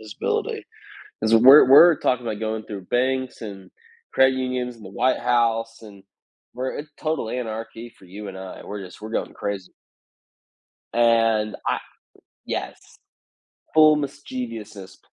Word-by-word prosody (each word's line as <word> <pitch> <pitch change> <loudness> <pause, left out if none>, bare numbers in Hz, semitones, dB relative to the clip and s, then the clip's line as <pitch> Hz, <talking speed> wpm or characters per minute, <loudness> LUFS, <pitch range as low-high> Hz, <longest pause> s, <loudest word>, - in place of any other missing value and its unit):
visibility, 110 -1 -3 0.6
because 110 +1 +3
we're 130 +5 +8
we're 160 +4 +8
talking 125 -1 0
about 110 -2 -3
going 110 0 -3
through 100 -3 -8
banks 130 0 -1
and 100 -3 -9 0.4
credit 130 0 +5
unions 125 -1 -3
and 110 -3 -14
the - - -9
White 130 +7 +1
House, 115 -1 0
and 100 -3 -14 0.5
we're 130 +2 -4
a - - -4 0.2
total 155 -7 -2
anarchy 115 -1 -6
for - - -20
you 100 +3 -9
and 95 - -8
I. 95 0 -9
We're 105 -1 -6
just 90 +2 -13
we're 110 - -7
going - - -3
crazy. 100 -3 -5 1.2
And 115 -2 +2
I - - +1 0.7
yes, - - -4 1.0
full 155 -1 +7
mischievousness. 115 -9 -7
115 Hz, 140 wpm, -23 LUFS, 105-130 Hz, 1.2 s, we're